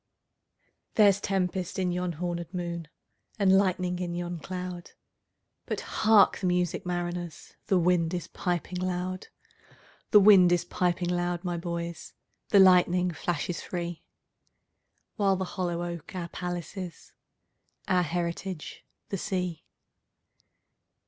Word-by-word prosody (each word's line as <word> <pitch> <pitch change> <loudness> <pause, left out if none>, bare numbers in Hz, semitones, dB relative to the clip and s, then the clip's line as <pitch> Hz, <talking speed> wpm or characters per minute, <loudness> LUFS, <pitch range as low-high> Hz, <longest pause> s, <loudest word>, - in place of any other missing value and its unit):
There's 200 -2 +5
tempest 185 -2 -1
in 185 -2 0
yon 180 0 -2
hornèd 170 +1 -4
moon, 170 -2 -4 0.5
And 195 -2 +4
lightning 185 -2 +1
in 175 -1 -3
yon 175 -1 -4
cloud:But 180 0 -8
hark 215 -2 +4
the 185 - -1
music, 180 0 0
mariners! 175 -1 -4
The 190 - +3
wind 170 -1 +2
is 175 -2 -3
piping 180 0 -3
loud; 185 0 -3 0.8
The 210 - +8
wind 195 -3 +7
is 175 0 +2
piping 175 0 0
loud, 175 0 -1
my 175 -2 -2
boys, 170 0 -5 0.4
The 205 - +5
lightning 180 -1 +5
flashes 170 +1 -3
free—While 175 +3 -5
the 190 0 -2
hollow 175 -2 -3
oak 170 +1 -6
our 170 -2 -4
palace 175 0 -5
is, 180 -4 -7 0.8
Our 180 -1 +3
heritage 175 +1 -4 0.3
the 195 - -3
sea. 180 -4 -3
180 Hz, 115 wpm, -28 LUFS, 175-185 Hz, 0.8 s, The